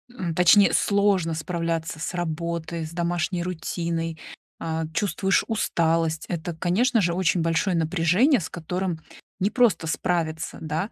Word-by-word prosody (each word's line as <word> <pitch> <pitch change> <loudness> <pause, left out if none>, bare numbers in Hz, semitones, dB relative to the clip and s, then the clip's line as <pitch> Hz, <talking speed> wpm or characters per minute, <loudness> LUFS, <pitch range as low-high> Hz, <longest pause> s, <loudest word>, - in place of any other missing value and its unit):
м, 170 -3 -3
точнее, 180 +4 +6
сложно 200 -5 +2
справляться 165 0 -3
с 165 - -4
работой, 170 -1 -3
с 155 - -8
домашней 175 +1 -1
рутиной, 165 -2 -3 0.4
а, 160 0 -2
чувствуешь 195 +2 +1
усталость, 165 -6 0
это, 170 -1 -3
конечно 220 +8 +2
же, 170 -2 +1
очень 185 -1 +1
большое 165 +3 +1
напряжение, 180 - +3
с 165 - -4
которым 180 0 -3 0.4
непросто 200 -4 +2
справиться, 165 -1 -2
да. 160 +6 -3
170 Hz, 125 wpm, -24 LUFS, 165-185 Hz, 0.4 s, точнее